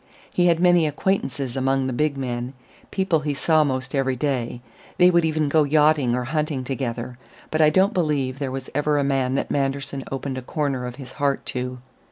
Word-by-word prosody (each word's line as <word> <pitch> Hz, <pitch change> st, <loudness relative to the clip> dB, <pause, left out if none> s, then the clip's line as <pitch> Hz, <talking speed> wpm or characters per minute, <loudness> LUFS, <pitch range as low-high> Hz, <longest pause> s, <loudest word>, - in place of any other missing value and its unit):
He 175 Hz, 0 st, +3 dB
had 165 Hz, -1 st, +3 dB
many 175 Hz, -2 st, +4 dB
acquaintances 140 Hz, -6 st, -1 dB
among 135 Hz, 0 st, +1 dB
the 130 Hz, -, -2 dB
big 150 Hz, +2 st, 0 dB
men, 125 Hz, -1 st, -3 dB, 0.4 s
people 190 Hz, -4 st, +1 dB
he 150 Hz, -1 st, -2 dB
saw 155 Hz, +2 st, +3 dB
'most 130 Hz, -2 st, -2 dB
every 135 Hz, -2 st, +1 dB
day; 125 Hz, -3 st, -2 dB, 0.4 s
they 180 Hz, 0 st, +6 dB
would 170 Hz, -1 st, +3 dB
even 155 Hz, -1 st, +1 dB
go 155 Hz, +2 st, +3 dB
yachting 150 Hz, -4 st, +3 dB
or 125 Hz, -, -1 dB
hunting 150 Hz, 0 st, -2 dB
together. 125 Hz, -2 st, -4 dB, 0.3 s
But 155 Hz, -, +1 dB
I 155 Hz, -, +7 dB
don't 190 Hz, +5 st, +3 dB
believe 145 Hz, -6 st, 0 dB
there 140 Hz, -2 st, -2 dB, 0.2 s
ever 150 Hz, +1 st, +1 dB
was -, -, +2 dB
a 140 Hz, -, 0 dB
man 135 Hz, -1 st, +1 dB
that -, -, -2 dB
Manderson 140 Hz, 0 st, -1 dB
opened 135 Hz, -1 st, -3 dB
a -, -, -8 dB
corner 135 Hz, -2 st, -2 dB
of 125 Hz, -, -7 dB
his 130 Hz, -2 st, -10 dB
heart 140 Hz, -1 st, -1 dB
to. 125 Hz, 0 st, -3 dB
140 Hz, 200 wpm, -23 LUFS, 130-155 Hz, 0.4 s, I